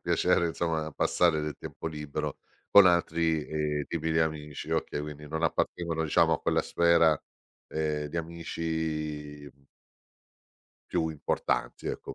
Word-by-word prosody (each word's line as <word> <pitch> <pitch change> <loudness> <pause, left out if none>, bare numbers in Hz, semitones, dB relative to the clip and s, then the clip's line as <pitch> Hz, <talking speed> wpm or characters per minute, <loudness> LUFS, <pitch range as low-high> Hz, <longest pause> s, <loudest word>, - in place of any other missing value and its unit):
piacere 85 - +2
insomma 80 -2 -2
passare 85 0 +2
del 75 -1 -4
tempo - - -7
libero 75 -1 -4 0.3
con 100 -1 +9
altri, 85 -3 +2
ehm, 75 -1 -1
tipi 80 -1 -2
di 80 - +2
amici. 75 -2 -3
Okay, - - -1
quindi 75 0 -7
non 80 +2 -3
appartengono 85 0 0
diciamo 75 - +4
a - - -4
quella - - +2
sfera, 85 -3 +4 0.5
uhm, 75 -1 -1
di 75 - -6
amici 80 -3 -4
mh 70 0 -30 1.2
più 80 - +1
importanti, 80 -2 -2
ecco. - - -5
80 Hz, 135 wpm, -29 LUFS, 75-85 Hz, 1.2 s, con